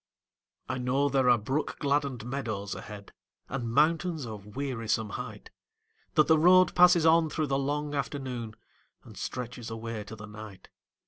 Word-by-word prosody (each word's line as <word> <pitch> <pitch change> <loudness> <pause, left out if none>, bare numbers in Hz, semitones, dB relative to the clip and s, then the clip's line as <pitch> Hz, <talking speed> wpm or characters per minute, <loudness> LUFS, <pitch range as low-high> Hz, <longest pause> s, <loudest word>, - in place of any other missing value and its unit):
I 130 - -3
know 135 +3 +1
there 135 -2 +3
are 120 - +6
brook 130 +8 -2
gladdened 140 -5 -1
meadows 110 -6 -3
ahead, 105 -1 -9 0.3
And 125 -3 -3
mountains 160 +3 +2
of 105 -1 -9
wearisome 115 -6 -1
height; 110 -1 -7 0.6
That 155 - +6
the 160 -1 +4
road 185 +3 +6
passes 175 -2 +6
on 160 0 +5
through 155 +1 -1
the 135 -1 0
long 145 +1 -2
afternoon 130 -5 -4 0.5
And - - -13
stretches 125 -2 -5
away 115 -1 -5
to 110 - -9
the 105 -1 -9
night. 105 -2 -11
130 Hz, 150 wpm, -29 LUFS, 110-150 Hz, 0.6 s, are